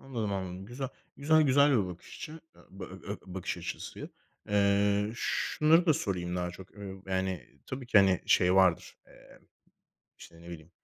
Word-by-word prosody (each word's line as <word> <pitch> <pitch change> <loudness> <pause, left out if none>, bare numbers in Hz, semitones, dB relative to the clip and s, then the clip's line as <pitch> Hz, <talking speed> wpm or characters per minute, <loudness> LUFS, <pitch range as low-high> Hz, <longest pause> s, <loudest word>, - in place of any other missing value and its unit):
Anladım, 115 -7 -3
anladım, 95 0 -5
güzel. 130 +4 -5 0.3
Güzel 155 +2 +4
güzel 140 +1 +5
bir 105 -7 +2
bakış 90 -1 -10
açı 160 +1 -8 0.2
e 95 - -16
b - - -4
ö 95 +2 -7
bakış 95 -1 -4
açısı. - - -7 0.4
Eee, 100 0 +2
şunları 160 +7 +2
da 160 - +6
sorayım 90 -5 -2
daha 90 0 -2
çok, 90 +2 -12
ııı, 95 -2 -8
yani, 95 -7 -3
tabii 130 -1 -6
ki, 110 - +6
hani, 95 -2 +4
şey 90 +1 +4
vardır, 95 -3 +3
emm, - - -19 0.7
işte, 85 0 -14
ne 85 - -12
bileyim, 80 -1 -10
95 Hz, 165 wpm, -30 LUFS, 90-125 Hz, 0.7 s, da